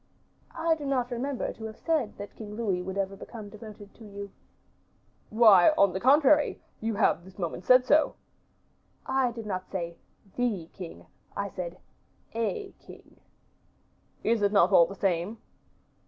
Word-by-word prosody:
"I 330 0 +2
do 315 -2 -5
not 260 -3 -1
remember 255 +2 -2
to 220 - -9
have 220 0 -7
said 310 -10 -1
that 205 0 -9
King 210 -2 -8
Louis 200 -6 -1
would 190 +2 -5
ever 195 0 -1
become 210 +1 -9
devoted 210 -1 -11
to 230 - -15
you." 200 -1 -8 1.0
"Why, 215 -5 +7
on 200 -2 +4
the 190 - -2
contrary, 290 +4 +4 0.2
you 225 -1 -2
have 200 -4 +2
this 190 +1 -15
moment 175 -1 -4
said 255 0 +6
so." 300 +4 +3 0.9
"I 265 -1 +1
did 230 -1 -8
not 185 -3 -4
say 170 -3 -4 0.4
the 210 -9 -1
king; 180 -3 -9 0.3
I 200 0 -2
said 180 -1 -6 0.6
a 385 - -2
king." - - -16 1.0
"Is 230 -1 +2
it 200 -1 +3
not 200 -2 +4
all 170 -3 +7
the 195 - -8
same?" 190 +3 -1
210 Hz, 155 wpm, -28 LUFS, 190-245 Hz, 1.0 s, Why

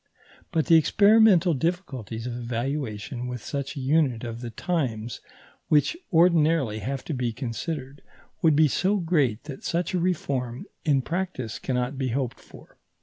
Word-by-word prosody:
But 160 -2 +1
the 165 -2 +6
experimental 200 0 +5
difficulties 130 - -3
of 125 - -3
evaluation 120 -1 -3
with 125 -3 -5
such 140 0 -4
a - - -5
unit 135 -3 +1
of 115 0 -5
the 120 - -5
times 120 -5 -2 0.5
which 150 - +3 0.2
ordinarily 160 - +3
have 130 +6 -4
to 160 - -3
be 125 -3 -1
considered, 130 +4 -5 0.4
would 160 -4 +4
be 155 +1 +5
so 190 +8 +1
great 150 - +1
that 145 -3 -9
such 170 +2 -1
a 180 - +1
reform 135 -9 -2 0.2
in 140 -4 +2
practice 165 - -3
cannot 125 +1 -2
be 130 - 0
hoped 125 0 -2
for. - - -16
140 Hz, 150 wpm, -26 LUFS, 120-165 Hz, 0.5 s, the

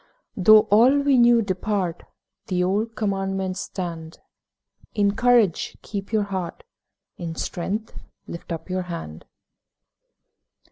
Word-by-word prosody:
Though 215 +3 +7
all 250 +7 +5
we 280 -3 +3
knew 235 -1 +5
depart, 185 -2 -2 0.5
The 180 -1 0
old 210 +5 -1
Commandments 195 -2 -2
stand: 165 -5 -6 0.8
'In 200 -1 +2
courage 240 -7 +2
keep 200 -1 -6
your 215 -2 +2
heart, 190 - -5 0.6
In 165 -2 -5
strength 200 +7 -4 0.3
lift 170 - -9
up 165 -1 -5
your 185 0 -2
hand.' 80 - -7
195 Hz, 110 wpm, -23 LUFS, 180-215 Hz, 0.8 s, Though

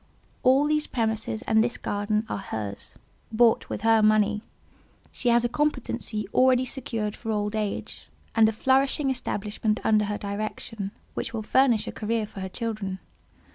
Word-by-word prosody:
All 265 +3 +5
these 300 0 +1
premises 220 -1 -2
and 220 0 +3
this 240 - -2
garden 210 +2 -1
are - - -3
hers, 105 - -6 0.4
bought 225 0 +3
with - - -4
her 225 0 +4
money; 215 0 +3 0.7
she 245 - 0
has 235 0 +4
a - - +4
competency 240 -6 -1
already 255 0 +4
secured 225 -5 -3
for 225 - -7
old 210 0 -1
age, 210 -2 -4 0.3
and 220 -1 +5
a - - 0
flourishing 265 +4 +2
establishment 215 -3 -2
under 215 -1 +3
her 205 0 -2
direction, 205 0 -4 0.2
which - - -4
will 220 - -3
furnish 245 -2 +3
a - - -4
career 220 0 -1
for 205 - -10
her 190 0 -4
children. 215 -3 -4
220 Hz, 160 wpm, -26 LUFS, 210-240 Hz, 0.7 s, All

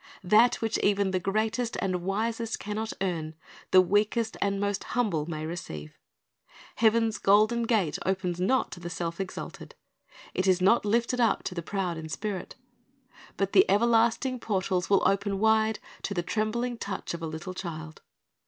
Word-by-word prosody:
That 215 +6 +5
which 225 -1 0
even 200 -1 +2
the 185 - +1
greatest 220 +5 -1
and 185 -2 -1
wisest 220 +4 -2
can 210 +1 -4
not 220 0 -2
earn, 165 -4 -2 0.3
the 185 - +7
weakest 210 +4 +1
and 200 0 +1
most 200 -1 -1
humble 170 -11 +1
may 155 -2 -4
receive. 80 - -7 0.8
Heaven's 225 0 +3
golden 215 +4 +3
gate 205 -10 +1
opens 185 -2 -1
not 260 +8 +1
to - - -8
the 175 0 -6
self 170 0 -4
exalted. 190 - -7 0.6
It 185 - 0
is 185 -1 +4
not 200 +5 +4
lifted 235 +4 +1
up 230 -2 +2
to - - -4
the 170 - -4
proud 180 -2 -3
in 160 0 -7
spirit. 195 +5 -4 0.8
But 195 0 -1
the 380 - +8
everlasting 235 +3 +3
portals 190 -4 -1
will 200 -1 +4
open 200 0 0
wide 220 +1 +3 0.2
to 200 - -3
the 175 - 0
trembling 230 +5 -1
touch 195 -3 -4
of 170 - -6
a 165 - -3
little 160 +4 -6
child. 160 -4 -7
200 Hz, 165 wpm, -28 LUFS, 180-220 Hz, 0.8 s, the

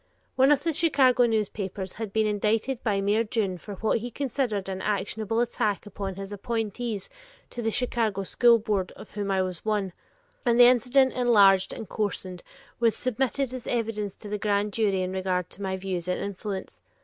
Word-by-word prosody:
One 265 +2 +5
of 290 - +3
the 330 -1 0
Chicago 270 -7 +4
newspapers 200 -3 -2
had 220 -3 -3
been 220 +1 +2
indicted 215 +4 0
by 205 -4 0
Mayor 205 +3 +2
Dunne 210 -5 -2
for 205 +4 -8
what 220 +4 0
he 240 +3 -5
considered 245 -6 -2
an 190 -1 -4
actionable 215 +2 -1
attack 215 -4 -1
upon 195 -1 -5
his 195 +1 -7
appointees 225 0 -3 0.4
to 240 - -5
the 225 - 0
Chicago 225 -4 0
School 235 +4 +5
Board 205 -4 -1
of - - -13
whom 205 -1 -3
I 190 -1 +2
was 185 -2 -5
one, 205 -4 -1 0.5
and 235 -2 +2
the 245 - +9
incident 255 +2 +4
enlarged 200 -6 +5
and 220 - -7
coarsened 185 -4 -3 0.4
was 230 -2 +3
submitted 255 +1 -1
as 255 -2 -7
evidence 220 -4 -2
to 210 - -11
the 210 0 -3
Grand 205 0 0
Jury 200 -4 +1
in 185 - -3
regard 185 -1 -2
to 200 - -9
my 190 -1 -2
views 185 -2 -4
and 180 - -1
influence. 200 0 -5
210 Hz, 185 wpm, -26 LUFS, 195-235 Hz, 0.5 s, the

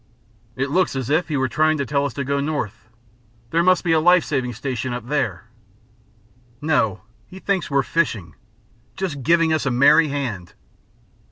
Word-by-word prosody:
"It 135 +2 -2
looks 180 -2 +1
as 130 0 -3
if 160 +3 +2
he 155 -3 -2
were 130 0 +1
trying 155 +5 +2
to 140 - -2
tell 140 +1 0
us 135 - -8
to 140 - -2
go 140 +1 -1
north. 120 -8 -4 0.6
There 165 - +2
must 185 +1 +3
be 175 - 0
a 160 - +4
life 175 +1 +4
saving 130 -4 -2
station 130 -2 -4
up 120 -2 -5
there." 110 - -1 1.2
"No! 145 -9 0 0.3
He 185 - -12
thinks 190 -1 -1
we're 140 -1 +2
fishing. 115 - -1 0.6
Just 165 -8 -3
giving 165 +4 +3
us 155 -3 0
a - - +3
merry 140 +6 +5
hand. 125 - -4
140 Hz, 175 wpm, -21 LUFS, 125-160 Hz, 1.2 s, merry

